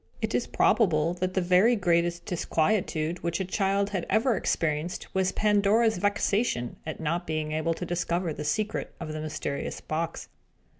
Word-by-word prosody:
It - - -2
is - - 0
probable 170 -6 +3
that 185 0 -1
the 190 - +2
very 185 +7 +4
greatest 170 -3 +1
disquietude 170 -2 0
which 170 +1 -1
a 190 - -1
child 195 +1 0
had 190 -4 -2
ever 225 +4 +3
experienced 160 -1 -1
was 190 -1 +1
Pandora's 210 +1 +3
vexation 205 - 0
at 155 - -5
not 170 +3 -2
being 155 -1 -2
able 155 +2 0
to 180 - -5
discover 175 -1 -1
the 150 - -6
secret 215 +8 -2
of 155 -2 -5
the 155 - -4
mysterious 155 -2 -4
box. 160 +1 -4
175 Hz, 160 wpm, -27 LUFS, 155-200 Hz, -, very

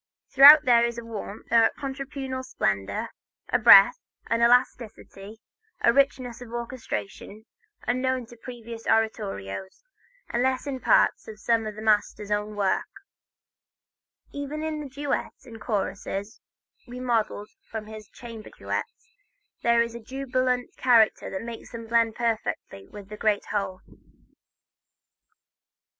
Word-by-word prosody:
Throughout 285 +3 +9
there 240 -2 +5
is 235 0 -1
a 235 - -7
warmth, 215 -2 -8
a 230 -1 +5
contrapuntal 270 -1 -5
splendor, 100 - -2 0.4
a - - +2
breadth, - - +8 0.3
an 230 0 +2
elasticity, 225 -3 0 0.4
a 235 - +4
richness 255 -3 0
of 240 -2 -10
orchestration, 230 - -6 0.4
unknown 255 +1 0
in 240 +1 -15
previous 235 -2 -9
oratorio, 100 - -1 0.6
unless 255 +3 0
in 275 -2 -4
parts - - +2
of 215 -1 -10
some 225 -1 +1
of 215 - -6
the 215 - -8
master's 210 -1 0
own 210 0 -1
works. 200 -2 0 1.4
Even 285 +2 -5
in 315 -1 -3
the 285 - -8
duet 280 +2 -3
and 225 -3 -12
choruses 200 0 -4 0.5
remodeled 240 -4 -2 0.2
from 220 -1 -6
his 215 -1 -11
chamber 230 -3 -10
duets, - - -5 0.5
there 235 0 +3
is 235 0 -6
that 235 -1 -11
jubilant 255 -2 -2
character 235 -4 +3
that 190 +3 -5
makes 230 0 -9
them 230 -1 -7
blend 230 -1 +2
perfectly 220 - -3
with 205 -1 -11
the 210 - -8
great 210 -2 0
whole. 195 -3 -3
230 Hz, 125 wpm, -25 LUFS, 215-255 Hz, 1.4 s, Throughout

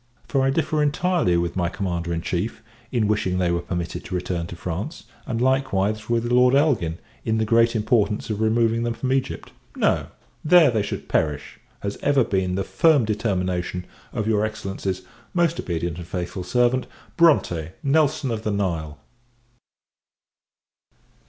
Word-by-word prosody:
For 135 - +1
I 135 - +3
differ 155 +1 +1
entirely 150 - +2
with 85 0 -1
my 90 -2 0
Commander 85 -3 -3
in 85 0 -2
Chief, 95 +5 -3 0.3
in 115 -4 +1
wishing 100 -3 0
they 90 -2 +1
were 85 0 0
permitted 85 0 -4
to 90 - -4
return 90 -1 -2
to 85 - -8
France; 90 - -5 0.2
and, 115 -2 -2
likewise, 110 -5 +1
with 120 0 0
Lord 125 +1 +5
Elgin, 125 - +2 0.3
in 110 0 0
the 110 - +1
great 115 +1 +3
importance 105 -1 +1
of 105 0 -2
removing 115 +1 +2
them 120 0 -1
from 130 +3 -1
Egypt. 135 -1 -2 0.2
No; - - +1 0.4
there 160 -3 +6
they 110 -3 +1
should 100 - -5
perish! 75 -2 -1 0.2
has 100 0 -3
ever 140 -3 +3
been 95 -4 0
the 95 - 0
firm 155 -2 +3
determination 90 -4 -1 0.3
of 105 - -2
your 105 -1 +2
Excellency's 95 -3 -3 0.3
most 170 -1 +2
obedient 85 -1 -3
and 85 - -8
faithful 90 +1 -4
servant, 125 +6 +1 0.3
BRONTE 90 - +3
NELSON 145 -2 +2
OF 110 -2 -2
THE 110 - -2
NILE. 85 -7 -2
110 Hz, 160 wpm, -23 LUFS, 90-125 Hz, 0.4 s, there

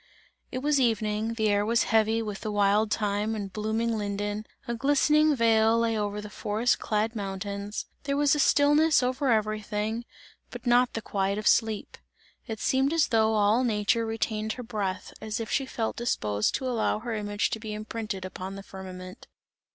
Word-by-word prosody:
It 255 - -4
was 295 -1 +3
evening, 220 -1 0
the 220 -2 +1
air 205 0 +2
was 230 +2 +2
heavy 225 +1 +3
with 210 -3 -5
the 215 - -3
wild 205 +1 +2
thyme 210 +1 0
and 200 -3 -5
blooming 220 +2 -1
linden, 205 +1 -3 0.2
a 235 - -1
glistening 290 +4 +3
veil 225 -1 +4
lay 230 -1 +1
over 205 -1 -2
the 210 - -7
forest 215 +5 0
clad 220 +2 -1
mountains, 200 0 -4 0.2
there 280 0 0
was 290 -1 +4
a 295 - +1
stillness 295 +1 +4
over 260 +2 0
everything, 215 +1 -1 0.4
but 245 +1 -9
not 245 +1 +4
the 225 - -4
quiet 195 0 -1
of 215 - -4
sleep. 220 -3 +1 0.5
It 220 -2 -5
seemed 265 +6 +1
as 330 -2 +2
though 220 -1 +3
all 215 +4 +3
nature 220 -1 +1
retained 220 -1 -2
her 250 - -7
breath, 205 -5 -4
as 220 +2 -3
if 225 - -5
she 270 - 0
felt 225 -3 -3
disposed 105 - 0
to 265 - -3
allow 235 -4 0
her 230 +2 -5
image 205 -1 -1
to 220 - -2
be 215 0 -6
imprinted 215 -2 -5
upon 185 +1 -6
the 195 - -8
firmament. 185 +1 -10
220 Hz, 180 wpm, -27 LUFS, 205-235 Hz, 0.5 s, veil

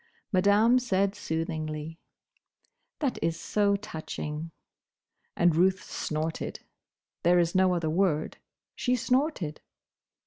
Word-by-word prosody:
Madame 205 +5 +5
said 200 -5 +1
soothingly, 160 -3 -4 1.0
"That 275 -6 -1
is 165 0 -1
so 205 -1 +2
touching!" 160 -4 -5 0.9
And 175 -2 +3
Ruth 185 +2 +3
snorted. 155 +1 -3 0.6
There 175 +1 +4
is 170 -1 +2
no 185 -1 +4
other 165 -2 -1
word. 165 -3 +1 0.4
She 250 0 +1
snorted. 250 - 0
180 Hz, 100 wpm, -28 LUFS, 160-205 Hz, 1.0 s, Madame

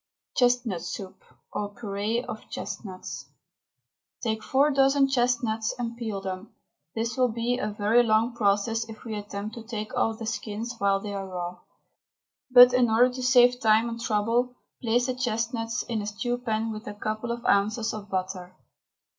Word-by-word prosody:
CHESTNUT 245 -7 +2
SOUP, 190 -2 -7 0.3
OR 205 - -2
PUREE 215 +1 -2
OF 220 - -8
CHESTNUTS. 195 -2 -6 0.9
Take 220 -2 -1
four 275 +6 +3
dozen 275 0 +4
chestnuts 240 -4 +1
and 235 -1 -3
peel 220 -4 -4
them. 190 +2 -6 0.4
This 230 +1 -1
will 255 -1 +3
be 235 +2 -1
a 210 - -1
very 210 +3 +3
long 225 +1 +2
process 225 +1 +1
if 220 -1 -10
we 225 - -4
attempt 205 +1 -5
to 230 - -8
take 220 -2 -5
off 225 -1 +1
the 225 - -6
skins 220 +1 -4
while 200 0 +3
they 205 0 -6
are 195 -1 -4
raw; 180 -1 -5 0.9
but 250 -1 +9
in 250 -2 +4
order 245 +3 +4
to 255 - -5
save 250 -1 +5
time 220 +1 +4
and 230 0 -6
trouble, 235 +2 +1 0.3
place 240 +1 +2
the 255 - 0
chestnuts 230 -1 -2
in 225 -3 -2
a 205 - -5
stew 240 +4 -2
pan 225 -2 -1
with 215 0 -7
a 205 - -5
couple 215 +3 -3
of 235 0 -5
ounces 215 +3 +2
of 210 -2 -7
butter. 185 -1 -4
225 Hz, 170 wpm, -27 LUFS, 210-245 Hz, 0.9 s, but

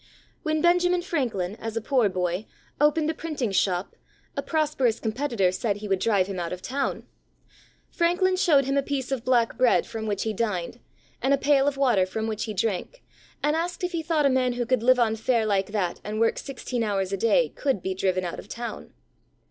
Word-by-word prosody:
When 310 0 0
Benjamin 355 0 +3
Franklin, 235 - -2
as 225 0 -5
a - - +2
poor 235 -1 +2
boy, 180 +2 -2 0.3
opened 300 +1 +3
a - - -6
printing 300 -9 -3
shop, 185 -1 0 0.4
a - - -1
prosperous 300 -7 0
com 220 - -2
petitor 230 -7 +1
said 200 +2 -1
he 210 0 -7
would 195 -2 +1
drive 200 -4 +2
him 190 -1 -5
out 170 -1 -3
of 180 0 -6
town. 275 +2 -2 0.9
Franklin 360 +2 +2
showed 300 -7 +4
him 275 +1 0
a - - +4
piece 275 -2 -3
of 260 -4 -2
black 245 -2 +2
bread 250 -1 +4
from 220 -1 -5
which 205 -2 -1
he 220 - -1
dined, 210 -1 -2 0.4
and 270 +2 +3
a - - -5
pail 275 0 +3
of 285 -1 0
water 240 -9 +3
from 220 +3 -3
which 220 -1 -2
he 215 - -4
drank, 220 - -2 0.4
and 295 +1 +2
asked 345 +2 -3
if 360 - -1
he 335 -2 -2
thought 315 -2 +1
a - - +5
man 255 -1 +2
who 240 0 -2
could 255 0 +1
live 255 +2 +5
on 225 -2 +2
fare 225 0 +1
like 195 -2 +1
that 200 -4 -2
and 210 +1 -4
work 225 0 +2
sixteen 255 -3 -4
hours 200 -3 -1
a - - 0
day 230 - +3
could 265 -10 -2
be 190 - -1
driven 185 -1 0
out 175 - -5
of - - -11
town 235 0 -6
235 Hz, 215 wpm, -26 LUFS, 200-285 Hz, 0.9 s, a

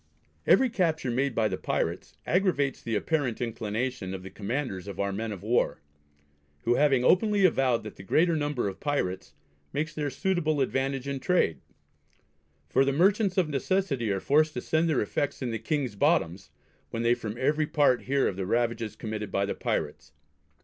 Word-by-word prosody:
Every 260 -2 +5
capture 160 - 0
made 130 +1 0
by 110 -1 +2
the - - -4
pirates - - -2
aggravates 170 -7 +1
the 115 -1 -2
apparent 130 +1 -1
inclinations 115 -2 -3
of 95 - -8
the 95 - -9
Commanders 105 -3 -4
of 100 -2 -7
our 100 0 0
men 110 +2 -3
of 100 -2 -7
war; 120 +3 +1 0.8
who 120 - +3
having 135 -2 +3
openly 205 - +4
avowed 130 -9 +2
that 105 - -9
the - - -9
greater 165 - +2
number 145 -6 -1
of 95 - -5
pirates 95 -11 -2 0.4
makes 155 +2 -2
their 150 -2 -2
suitable 155 0 0
advantage 135 0 -1
in 140 -1 -2
trade; 130 - +1 1.1
for 135 - +3
the 135 - +1
Merchants 190 +6 +2
of 175 -5 +2
necessity 140 - 0
are 95 - 0
forced 155 +7 +2
to 125 - -2
send 160 +4 +1
their 150 - +2
effects 140 +6 -2
in 120 - -2
the 115 - -3
King's 145 -8 -1
bottoms, 90 -2 +1 0.4
when 115 - -3
they 120 +1 +4
from 110 -2 -5
every 150 +4 +1
part 145 -5 +2
hear 135 +1 +2
of 95 - -3
the 95 -2 -3
ravages 115 -1 0
committed 110 -1 -5
by 100 0 +1
the 100 - -2
pirates. - - -3
130 Hz, 180 wpm, -28 LUFS, 110-155 Hz, 1.1 s, Every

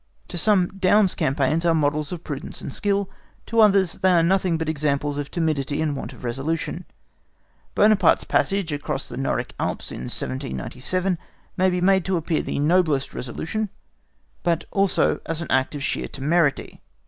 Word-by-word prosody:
To - - -7
some 190 -2 +3
Daun's 190 +1 +4
campaigns 140 +4 +1
are 170 -1 +3
models 150 -1 0
of 175 -2 -6
prudence 140 -3 -6
and 140 - -6
skill. 200 -1 0 0.4
To 230 - 0
others, 195 -5 +5
they 190 -1 +4
are 170 -1 +4
nothing 180 -1 +2
but 160 -1 -3
examples 145 -1 0
of 145 - -4
timidity 150 -4 -1
and 155 -2 0
want 135 - -5
of - - -14
resolution. 155 +8 -3 0.9
Buonaparte's 205 -4 +4
passage 195 -5 0
across 145 - -3
the - - -7
Noric - - -2
Alps - - -3
in 60 - -6
1797 130 - -2 0.4
may 185 0 +3
be 180 -1 -1
made 190 0 +4
to 190 -2 +1
appear 165 0 0
the - - -4
noblest 150 -2 +2
resolution, 180 - -3 0.7
but 170 -1 0
also 195 -1 +2
as 165 +1 -2
an - - -7
act 130 +3 +1
of 140 - -4
sheer - - -1
temerity. 150 +1 0
165 Hz, 165 wpm, -23 LUFS, 145-185 Hz, 0.9 s, others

